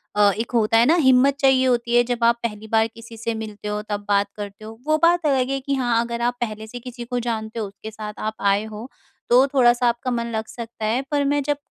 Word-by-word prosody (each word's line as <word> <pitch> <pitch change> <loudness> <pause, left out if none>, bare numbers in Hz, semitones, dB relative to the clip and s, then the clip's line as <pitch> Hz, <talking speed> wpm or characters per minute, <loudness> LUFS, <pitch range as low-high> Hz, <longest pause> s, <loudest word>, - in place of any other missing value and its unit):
अ, 205 -1 +5
एक 225 +2 -3
होता 225 -2 +3
है 230 - +5
ना, 320 - +4
हिम्मत 270 -3 +4
चाहिए 265 -2 +4
होती 240 -1 +1
है, 240 - +6
जब 240 -1 -3
आप 235 0 +4
पहली 220 -2 -4
बार 220 0 +2
किसी 230 0 -13
से 230 +1 -2
मिलते 215 -2 -7
हो, 210 0 -2
तब 205 -1 -3
बात 200 0 +2
करते 205 +1 -8
हो। 220 +1 -10
वो 310 0 +3
बात 345 0 +4
अलग 265 -3 +2
है 275 0 -1
कि 275 +1 -2
हाँ, 240 -3 +1
अगर 235 0 -4
आप 245 +1 0
पहले 215 -2 -4
से 245 +3 -8
किसी 240 0 -8
को 245 +1 -2
जानते 220 0 -4
हो, 220 - -2
उसके 200 +2 -10
साथ 215 -1 -7
आप 215 0 -2 0.2
आए 200 +1 0
हो, 220 +3 -8 0.4
तो 250 +3 +6
थोड़ा-सा 245 -2 +4
आपका 240 +2 -2
मन 235 -1 -2
लग 220 -1 -2
सकता 230 -2 -7
है। 230 +4 +1
पर 290 -1 +2
मैं 285 +1 +1
जब 290 +1 0
235 Hz, 255 wpm, -22 LUFS, 220-255 Hz, 0.4 s, है